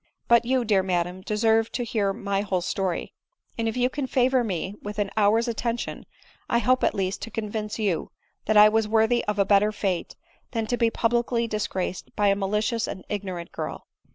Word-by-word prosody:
But 235 0 +5
you, 255 0 +1
dear 205 -3 +3
madam, 180 0 -1
deserve 220 +2 +2
to 245 - -1
hear 210 -4 0
my 200 -2 -2
whole 190 -3 -1
story; 185 -1 -2 0.4
and, 230 -1 -1
if 225 - -5
you 250 0 +3
can 265 +1 -3
favor 255 0 +2
me 190 -2 -3
with 205 0 -6
an 205 -2 -1
hour's 220 +3 +3
attention, 235 +1 -3 0.4
I 235 - +3
hope, 255 +2 +2
at - - +2
least, 190 0 -2
to - - -5
convince 215 -1 -4
you 200 -7 -1 0.4
that 215 0 +3
I 210 0 +10
was 220 0 +2
worthy 220 +2 +3
of 210 -1 -1
a 200 - +3
better 205 +1 +4
fate 195 -4 -2 0.4
than 225 -2 -1
to 245 - 0
be 230 -1 +3
publicly 235 +1 +1
disgraced 205 -4 -3
by 205 -1 +3
a 195 - +3
malicious 210 +3 0
and 185 - -7
ignorant 185 -4 -4
girl. - - -5
215 Hz, 195 wpm, -25 LUFS, 195-230 Hz, 0.4 s, I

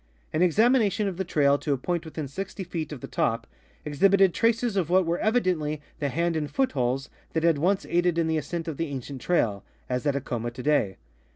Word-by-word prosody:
An 155 - +1
examina 215 - +4
tion 210 0 -1
of 185 -3 -4
the 190 - -1
trail 145 -5 +2
to 145 - 0
a - - 0
point 170 +5 -2
within 155 -2 -5
60 190 +7 -5
feet 165 -4 -5
of 140 -5 -7
the - - -6
top 115 0 0 0.4
exhibited 190 +5 +4
traces 230 -1 +1
of 180 -5 0
what 185 0 +4
were 170 +1 0
evidently 180 -10 +1 0.2
the 145 - 0
hand 170 +4 0
and 150 -2 -2
foot 265 -1 +1
holes 130 0 -1 0.3
that 160 - 0
had 165 -4 +3
once 190 +5 +1
aided 175 -1 +1
in 165 - +2
the 160 0 +1
ascent 170 +1 -5
of 155 -4 -4
the 165 - -1
ancient 135 -1 -6
trail, 110 - +1 0.2
as 125 +3 -2
at 140 - +2
Acoma 120 -4 -3
today. 125 -5 0
160 Hz, 215 wpm, -26 LUFS, 140-185 Hz, 0.4 s, examina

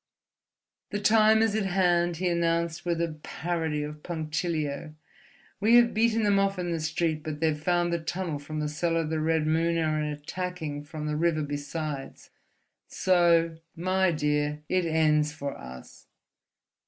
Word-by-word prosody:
"The 205 - -2
time 220 +1 +5
is 225 -2 +1
at 215 -3 0
hand," 175 -2 +2
he 180 +2 -1
announced 170 -1 0
with 170 -1 0
a 155 -2 -4
parody 160 -3 -2
of 150 0 -7
punctilio. 155 -2 -3 0.6
"We 220 +4 +4
have 240 -1 +6
beaten 225 0 +2
them 200 -1 +3
off 195 0 +1
in 175 -1 -2
the 165 - -1
street, 160 0 -1
but 150 -1 -5
they 160 0 +2
have 150 -1 -3
found 175 +1 +1
the 170 - 0
tunnel 165 -2 -3
from 155 +2 -5
the 150 - -1
cellar 165 +2 0
of 155 -1 -4
the 160 - 0
Red 160 0 +1
Moon, 165 +2 +1
and 155 -2 0
are 150 - -2
attacking 150 -1 -5
from 150 +1 -6
the 150 0 -1
river 155 -1 +1
besides. 145 0 -5 0.6
So, 170 -3 +3 0.2
my 185 +2 +1
dear, 150 -1 -1
it 185 -1 +1
ends 155 -2 +2
for 140 -2 -5
us...." 65 0 -12
165 Hz, 165 wpm, -27 LUFS, 150-175 Hz, 0.6 s, have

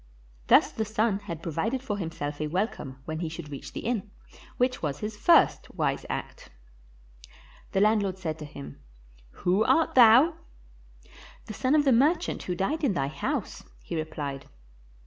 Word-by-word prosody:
Thus - - +5
the 220 - -2
son 215 -1 0
had 170 -5 -7
provided 210 - -2
for 205 -6 -3
himself 150 -4 -4
a 155 - -1
welcome 160 - -3
when 155 0 -4
he 165 -2 -3
should 160 -2 -8
reach 140 - -8
the - - -6
inn, 220 -4 -2 0.5
which 255 +1 +1
was 145 -3 -2
his 210 +6 -5
first 210 - +4
wise - - -1
act. - - -6 1.2
The 195 - +2
landlord 205 -3 +2
said 160 -4 -4
to 150 - -6
him, 140 -1 -10 0.7
"Who 185 +4 +3
art 325 +7 +2
thou?" 255 +7 +7 1.1
"The 215 - -7
son 255 +7 +1
of 295 -1 +3
the 270 - +5
merchant 310 +8 +2
who 180 - -3
died 290 - -1
in 255 -8 +2
thy 135 -5 -1
house," - - -3 0.2
he - - -7
repHed. 145 -3 -4
195 Hz, 165 wpm, -27 LUFS, 155-230 Hz, 1.2 s, thou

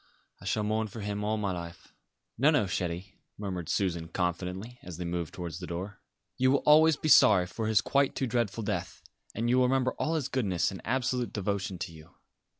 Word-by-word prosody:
"I - - -11
shall 105 - 0
mourn 110 +1 0
for 110 +1 -8
him 105 0 -3
all 110 +1 0
my 100 -2 -1
life." 85 -1 -8 0.4
"No, 140 +5 +4
no, 150 -7 +4
chérie," 90 +1 -3 0.2
murmured 95 -5 -4
Susan 85 -4 0
confidentially, 90 +6 -3
as 90 -3 -8
they 90 - -4
moved 85 -1 -3
towards 85 -2 -6
the 90 - -7
door. 95 +4 -6 0.4
"You 130 +1 +4
will 140 +1 +2
always 155 0 +6
be 155 - -3
sorry 105 -10 +7
for 110 +4 -4
his 110 -3 +4
quite 140 +4 +1
too 135 - 0
dreadful 115 -2 -1
death, 105 0 -4 0.3
and 115 +2 -1
you 125 +2 +3
will 130 - +5
remember 130 0 +2
all 160 - 0
his 145 -5 -1
goodness 105 - 0
and 95 - -8
absolute 125 -1 0
devotion 100 -2 -2
to 85 - -5
you. 80 0 -15
105 Hz, 205 wpm, -29 LUFS, 90-125 Hz, 0.4 s, sorry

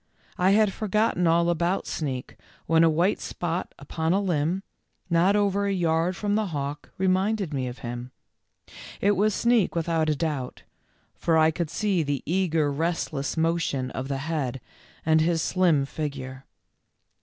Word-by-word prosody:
I 180 +1 +4
had 205 0 +4
forgotten 210 -4 +1
all 170 +1 +3
about 175 +2 0
Sneak 130 -5 -4 0.3
when 165 0 +4
a 165 - +6
white 170 +6 +2
spot 175 +1 -4
upon 160 +4 -2
a 195 - +3
limb, 180 -1 0 0.5
not 175 +4 +4
over 200 -1 +1
a - - +1
yard 170 0 +1
from 205 +2 -1
the 215 0 +1
hawk, 145 -3 -4
reminded 190 -1 +1
me 130 -2 -1
of 125 0 -6
him. 120 +1 -5 0.9
It 200 - +3
was 205 +1 +2
Sneak, 235 -7 +2
without 165 -1 +1
a 150 - +2
doubt, 145 -5 -3 0.5
for 165 -1 +1
I 160 0 +5
could 165 0 -3
see 190 +1 0
the 145 -3 -2
eager 165 -4 +1
rest 165 +3 -1
less 140 +2 -3
motion 160 -6 0
of 130 - -4
the 135 -1 -2
head, 135 -3 -2 0.5
and 160 0 +4
his 165 0 +1
slim 170 -7 +2
figure. 135 -3 -6
165 Hz, 160 wpm, -26 LUFS, 145-185 Hz, 0.9 s, a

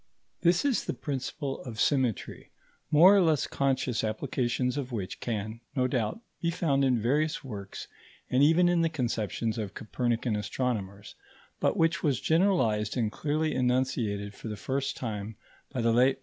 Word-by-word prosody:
This 175 +7 +3
is 275 -5 +1
the - - -3
principle 140 0 -4
of 115 -5 -7
symmetry, 130 - 0 0.4
more 175 +7 +7
or 200 - +5
less 160 -5 +3
conscious 135 -3 0
applications 125 +2 -1
of 135 -3 -4
which 100 -6 -4
can, 110 0 -4
no 130 -2 +2
doubt, 125 - -1 0.2
be 170 - +1
found 160 -5 +1
in 130 -3 +3
various 150 +7 0
works 100 -7 -7 0.4
and 125 - +2
even 165 +5 +5
in 175 -1 +3
the 165 - +2
conceptions 115 -5 -2
of 105 -2 -5
Copernican 120 0 -1
astronomers, 105 -3 -3 0.5
but - - +1
which 165 +1 +2
was 140 -6 +1
generalized 130 - +2
and 110 -3 0
clearly 155 +3 -1
enunciated 125 -5 0
for 115 - -9
the 105 -1 -5
first 135 +5 -2
time 110 -3 -4 0.4
by 130 - -2
the 115 0 +3
late 130 +3 +4
M. - - -29
125 Hz, 165 wpm, -29 LUFS, 110-150 Hz, 0.5 s, more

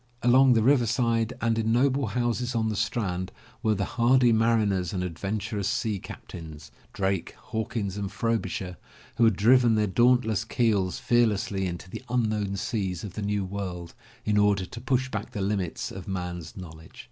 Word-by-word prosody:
Alon^^ 125 +1 +6
the 110 - +3
river 125 -1 +4
side 115 -1 +1
and 115 -1 +1
in 110 0 +1
noble 130 +2 +2
houses 120 +3 -1
on 110 -1 +1
the 110 - -2
Strand 95 -4 -2 0.3
were 110 -2 +2
the 100 0 -1
hardy 125 0 +3
mariners 110 -6 +2
and 90 -2 -1
adventurous 100 +3 -3
sea 110 -1 -1
captains, 80 -4 -10 0.2
Drake, 95 -2 -1
Hawkins 110 -3 -4
and 100 -1 -3
Frobisher, 95 -6 -2 0.4
who 115 - +5
had 110 -3 +4
driven 120 +3 +5
their 105 -1 +2
dauntless 110 0 +3
keels 110 -6 +1
fear 120 -1 +3
lessly 100 -2 -1
into 85 0 -6
the - - -7
unknown 110 -5 0
seas 95 -5 -2
of 100 -3 -6
the 105 - -5
new 100 -1 -1
world, 90 -3 -5 0.3
in 105 -1 +2
order 100 -2 +3
to 115 +6 -9
push 130 0 0
back 105 -2 -5
the - - -4
limits 95 -3 -2
of 95 -1 -8
man's 90 -3 -5
knowledge. 80 -3 -11
105 Hz, 170 wpm, -27 LUFS, 95-115 Hz, 0.4 s, Alon^^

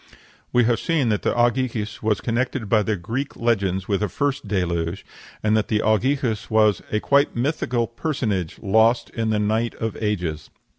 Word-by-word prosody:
We 125 - +4
have 115 0 +2
seen 155 -8 +1
that 105 -2 -1
Ogyges 120 -3 0
was 110 -2 0
connected 120 -1 -1
by 110 +1 +3
the 105 +1 0
Greek 115 +10 -4
legends 95 -5 0
with 100 -1 0
a 105 - 0
first 140 +4 -2
deluge, 85 -3 -1 0.4
and 110 0 +3
that 110 - +1
Ogyges 110 +2 +1
was 110 -3 +3
"a 105 - +1
quite 140 +5 +2
mythical 120 -2 0
personage, 115 - -2
lost 110 +4 +3
in 115 -1 -2
the 110 - +1
night 110 +3 0
of 115 -2 -3
ages." 90 -8 -2
110 Hz, 160 wpm, -23 LUFS, 105-120 Hz, 0.4 s, We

